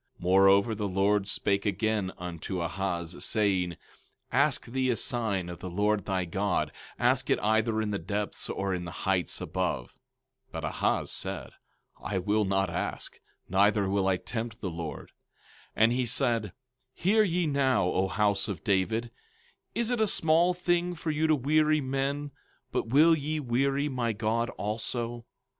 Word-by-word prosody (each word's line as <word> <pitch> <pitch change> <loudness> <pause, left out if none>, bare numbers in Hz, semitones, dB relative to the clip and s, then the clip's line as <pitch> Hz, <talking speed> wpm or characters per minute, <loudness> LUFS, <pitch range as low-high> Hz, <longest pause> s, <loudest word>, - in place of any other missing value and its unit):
17:10 - - -23
Moreover, 95 +4 +5
the 105 -1 -2
Lord 100 +1 +1
spake 100 0 0
again 105 -1 0
unto 90 0 -5
Ahaz, 85 0 -3
saying: 95 -5 +1
17:11 - - -16 0.5
Ask 140 +2 +2
thee 130 +2 -1
a 120 - +2
sign 110 -7 -1
of 85 -1 -7
the 90 - -6
Lord 105 +2 +1
thy 95 -2 -1
God; 95 +3 -1 0.3
ask - - +2
it - - +4
either 110 +1 +2
in 110 -1 -1
the 100 - -1
depths, 105 0 -3
or 95 -1 -1
in 90 -1 -3
the 85 - -6
heights 90 -4 0
above. 60 - -2
17:12 - - -28 0.6
But - - -4
Ahaz - - 0
said: - - -4 0.5
I 95 - -2
will 105 +3 +1
not 95 -2 +1
ask, 90 - -4 0.3
neither 100 +1 +3
will 95 0 +1
I 95 -1 +2
tempt 115 +2 -5
the 95 - -3
Lord. 80 -3 -6 0.7
17:13 - - +4
And 115 - +5
he 125 +1 +1
said: 115 -4 0 0.4
Hear 210 +5 +3
ye 180 -4 +1
now, 140 -6 +2
O 95 +1 +1
house 100 +3 +1
of 100 -7 -5
David; 110 +4 0 0.6
is 235 +1 0
it 240 -2 +1
a 220 - +4
small 170 0 +3
thing 175 0 0
for 160 -1 -3
you 155 +1 +1
to 155 - +4
weary 155 +3 +3
men, 140 +1 -2 0.4
but - - -1
will 155 +7 +6
ye 155 +1 -2
weary 135 +2 +1
my 125 -5 -1
God 115 +3 0
also? 115 +2 -3
110 Hz, 170 wpm, -29 LUFS, 95-135 Hz, 0.7 s, will